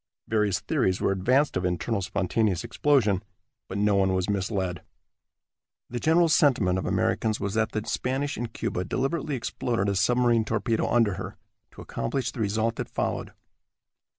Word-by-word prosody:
Various 105 -3 +1
theories 105 - 0
were - - +1
advanced 125 +10 +2
of 90 - -1
internal 90 +4 -1
spontaneous 95 +1 0
explosion, 110 -10 +2 0.5
but - - -4
no 105 0 +2
one 95 -1 +2
was 95 +2 0
misled. 95 -3 -2 1.1
The 120 - -3
general 165 +4 +4
sentiment 120 - +3
of - - -4
Americans 110 -1 0
was 100 -1 -2
that 110 0 +1
the 110 - -1
Spanish 135 +3 -1
in 120 - -3
Cuba 90 -4 -3
deliberately 135 - -1
exploded 115 -3 -2
a 100 - 0
submarine 120 +3 +3
torpedo 110 +1 0
under 110 -6 +2
her, - - -7 0.4
to - - -11
accomplish 130 +2 -3
the - - -9
result 110 +2 0
that - - -4
followed. - - -3
110 Hz, 155 wpm, -26 LUFS, 95-125 Hz, 1.1 s, general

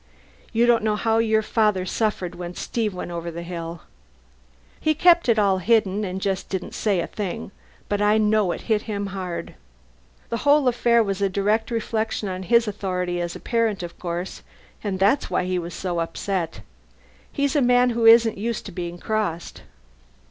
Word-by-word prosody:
You 235 +1 +3
don't 240 -1 +4
know 215 -1 +1
how 225 +1 +1
your 220 -1 +2
father 210 -4 +1
suffered 185 -3 -1
when 175 0 -7
Steve 225 -3 -2
went 180 -1 -6
over 170 0 -4
the 170 +1 -6
hill. 170 -1 -6 1.0
He 310 0 +1
kept 340 -3 +5
it 225 - +4
all 195 -3 +3
hidden 210 0 +2
and 190 -1 -3
just 190 -1 -2
didn't 190 -2 -4
say 205 -4 0
a - - -2
thing, 200 -2 -5 0.4
but 205 0 -1
I 210 +1 +4
know 215 -3 +2
it - - -5
hit 215 -2 0
him 205 -1 -2
hard. 185 -3 -5 0.8
The 230 - -1
whole 285 +1 +3
affair 235 -1 +3
was 200 -1 -3
a 200 - +2
direct 210 +4 0
reflection 220 -2 -2
on 185 0 -4
his 235 +4 +3
authority 180 -3 -2
as 175 0 -4
a - - -7
parent, 225 -5 0
of 170 - -8
course, 175 +1 -4 0.4
and 200 -3 -2
that's 205 +9 +2
why - - 0
he 185 0 -1
was 170 0 -6
so 175 -2 -2
upset. 165 - -3 0.7
He's 280 +1 0
a 290 - +4
man 245 0 +4
who 230 -1 +2
isn't 225 -2 +6
used 230 +1 -3
to 200 - -7
being 175 -1 -5
crossed." 200 -4 -3
205 Hz, 185 wpm, -23 LUFS, 180-225 Hz, 1.0 s, isn't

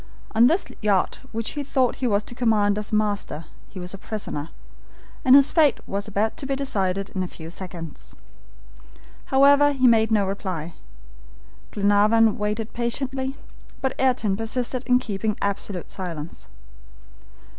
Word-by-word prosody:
On 230 +2 +6
this 340 +8 +2 0.2
yacht 205 -3 +1
which 225 0 -3
he 290 - -3
thought 260 -3 0
he 260 - -1
was 205 -2 +1
to - - -8
command 210 -4 +2
as 210 - -4
master, 205 -7 -1 0.2
he 190 - -9
was 180 +1 -5
a 195 - -8
prisoner, 170 -9 -5 0.7
and 260 +1 +7
his 280 0 +6
fate 310 -4 +4
was 200 +1 -3
about 215 +1 -1
to 270 - -4
be 275 - 0
decided 195 -8 -1
in 185 - -3
a 185 - -2
few 165 -1 -10
seconds. 175 -3 -8 1.1
However, 285 +2 +5
he 260 -2 +1
made 225 -2 +5
no 210 -3 +3
reply. 185 -4 -4 1.0
Glenarvan 210 +2 +3
waited 210 +1 -2
patiently. 265 +3 -2 0.4
But 265 -1 -1
Ayrton 245 -6 +2
persisted 240 +3 -2
in 250 -1 +5
keeping 215 -2 -2
absolute 200 -2 -2
silence. 170 - -6
215 Hz, 145 wpm, -24 LUFS, 195-255 Hz, 1.1 s, and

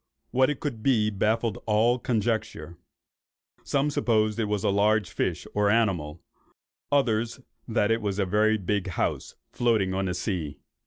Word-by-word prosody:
What 130 +2 +3
it 150 - -3
could 130 -7 -4
be, 110 -4 +2
baffled 110 +3 0
all 115 +3 +3
conjecture. 110 -8 -2 0.9
Some 140 +1 0
supposed 110 -4 +1
it 110 - 0
to 105 0 0
be 95 - -8
a - - +3
large 105 -1 +2
fish - - -2
or 105 0 +2
animal, 90 -9 0 0.7
others 120 -5 +1 0.3
that 105 - +1
it 115 0 +1
was 100 -2 -2
a 100 - +1
very 110 +3 +2
big 100 0 -2
house, 90 - -2 0.2
floating 110 -6 +1
on 95 0 -1
the 90 -2 -2
sea. 90 -6 -3
110 Hz, 160 wpm, -26 LUFS, 100-115 Hz, 0.9 s, What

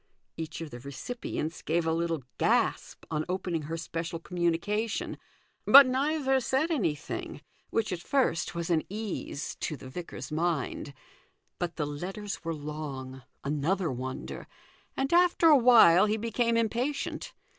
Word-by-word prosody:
Each 160 0 -6
of 160 -3 -6
the 120 - -8
recipients 150 - -5
gave 165 +1 0
a 160 - +1
little 165 -3 -1 0.2
gasp - - +1
on 155 -1 0
opening 180 -3 -1
her 160 +3 -4
special 165 +1 -4
communication, 180 +6 -1 0.4
but 280 0 +10
neither 270 +1 +1
said 270 +6 0
anything, 165 - -2 0.3
which 220 -4 0
at 175 - -3
first 250 - 0
was 170 0 -2
an 160 -2 +3
ease 205 -7 -4
to 155 - -3
the 130 - -10
vicar's 170 +2 -7
mind. 155 -3 -2 0.6
But 175 -1 -2
the 150 - -1
letters 185 +9 -5
were 165 0 -2
long 145 -3 -6 0.2
(another 150 +4 0
wonder), 130 +1 -6 0.5
and 270 +4 0
after 345 -1 +5
a 305 - +8
while 225 -7 +7
he 215 +1 +1
became 230 +1 +1
impatient. 240 +6 -2
170 Hz, 140 wpm, -29 LUFS, 155-230 Hz, 0.6 s, but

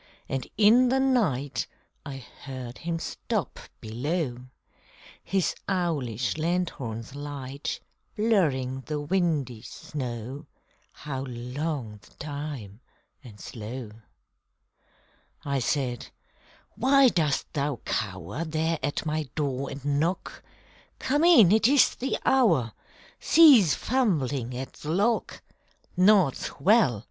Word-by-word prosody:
And 135 -1 -3
in 235 +4 +6
the 265 +1 +2
night 200 - +1 0.4
I 135 -2 -8 0.2
heard 130 -3 -7
him 170 0 -2
stop - - -3 0.2
below, 125 +2 -3 0.8
His 195 -2 0 0.2
owlish 150 - -1
lanthorn's 145 -10 -2
light 140 -1 -5 0.4
Blurring 150 - +1
the 150 -1 -2
windy 145 - 0
snow 125 0 -6 0.4
How 135 -3 -6
long 125 -2 -4
the - - -21
time 140 -8 -6 0.4
and 110 -5 -13
slow! 115 +1 -7 1.5
I 140 -1 0
said, 125 -1 -1 0.7
_Why 265 +1 +5
dost 150 -5 0
thou 145 -1 -1
cower 95 - -3
There 160 0 -1
at 145 - -2
my 155 -2 -2
door 140 -3 -2
and 140 0 -8
knock? 170 +5 -2 0.6
Come 290 +4 0
in! 280 - +7
It 220 +1 +5
is 280 0 +5
the 265 +2 -2
hour! 170 - +3 0.5
Cease 265 - +7
fumbling 140 - 0
at 130 +1 -6
the 150 - -8
lock! 205 +8 0 0.5
Naught's 185 -6 +3
well! 185 - +4
145 Hz, 105 wpm, -27 LUFS, 125-185 Hz, 1.5 s, in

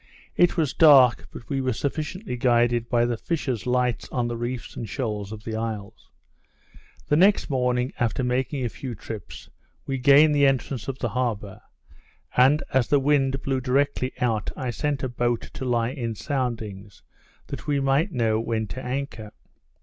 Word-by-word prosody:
It 175 0 +3
was 155 -5 +1
dark, 135 -6 +6
but 115 - -11
we 135 -2 -1
were 130 -1 0
sufficiently 155 - -3
guided 120 -1 +2
by 120 -1 +3
the 120 -1 -1
fishers 130 - -3
lights 125 -1 0
on 120 -2 -1
the 120 - -3
reefs 120 +1 -5
and 115 - -6
shores 105 -5 -3
of 110 -1 -8
the 115 -1 -4
isles. 110 -2 -5 1.0
The 150 - +2
next 190 0 +4
morning, 125 -1 0
after 120 +2 0
making 130 +2 -1
a - - -1
few 115 +6 -7
trips, 105 -1 -9 0.3
we 135 -1 -2
gained 140 +3 +6
the 145 -1 +4
entrance 135 -2 -1
of 135 -1 -3
the 120 - -2
harbour; 110 -4 -3 0.7
and, 135 +4 +5
as 130 -3 +3
the 145 - +3
wind 135 -1 +1
blew 135 -1 -1
directly 130 0 0
out, 115 -4 0
I 130 -3 -2
sent 145 +3 -2
a - - +1
boat 120 -1 -1
to 130 - -5
lie 120 -1 +1
in 120 -5 -4
soundings, 110 -8 -4 0.4
that - - -8
we 145 -1 +1
might 140 +7 +1
know 115 -6 +1
when 115 -1 -1
to 130 - -6
anchor. 125 -5 -4
125 Hz, 175 wpm, -25 LUFS, 115-135 Hz, 1.0 s, dark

